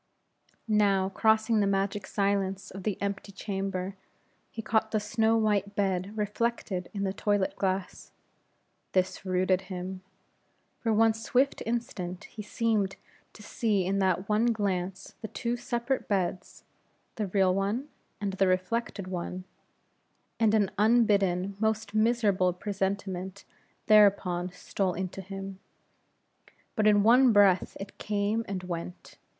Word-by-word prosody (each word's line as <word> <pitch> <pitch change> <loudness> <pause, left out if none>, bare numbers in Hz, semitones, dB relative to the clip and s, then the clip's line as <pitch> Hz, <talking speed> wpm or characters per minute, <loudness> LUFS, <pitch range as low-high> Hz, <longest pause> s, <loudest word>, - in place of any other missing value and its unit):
Now, 200 -3 +3
crossing 220 +2 +2
the 200 - +2
magic 195 0 -1
silence 195 -1 -1
of 195 - -8
the 200 0 -2
empty 200 0 -3
chamber, 195 -1 -4 0.5
he 225 - -7
caught 220 0 +1
the 220 - 0
snow 220 +2 +2
white 205 -2 +1
bed 195 +1 -1
reflected 210 -3 -2
in 200 -1 -3
the 190 -1 -1
toilet 205 -1 0
glass. 190 -1 -3 0.8
This 185 +1 0
rooted 185 +1 +1
him. 185 0 -5 0.8
For 225 - 0
one 225 +1 +4
swift 250 +5 0
instant, 185 -6 -3
he 215 - -9
seemed 210 -2 0 0.4
to 210 - -13
see 205 -4 0
in 195 +2 0
that 190 0 +1
one 215 +2 +2
glance 195 -4 -2
the 220 - -4
two 235 +2 -2
separate 240 +2 -2
beds 185 -3 -2 0.5
the 210 -2 -3
real 190 -1 +3
one 205 +8 -1 0.3
and 200 -2 -2
the 195 0 +2
reflected 185 +2 -1
one 185 0 -5 1.0
and 220 -1 +4
an 205 -3 +2
unbidden, 200 -4 +3
most 220 -1 -1
miserable 215 -5 +2
presentiment 190 0 -3 0.4
thereupon 195 -4 +4
stole 185 +1 -2
into 190 +1 -4
him. 195 0 -7 1.2
But 215 -1 +2
in 205 -1 +5
one 245 +3 +6
breath 200 -3 +4
it 195 +1 -9
came 210 +2 0
and 190 -2 -4
went. 175 0 -7
200 Hz, 130 wpm, -28 LUFS, 190-215 Hz, 1.2 s, one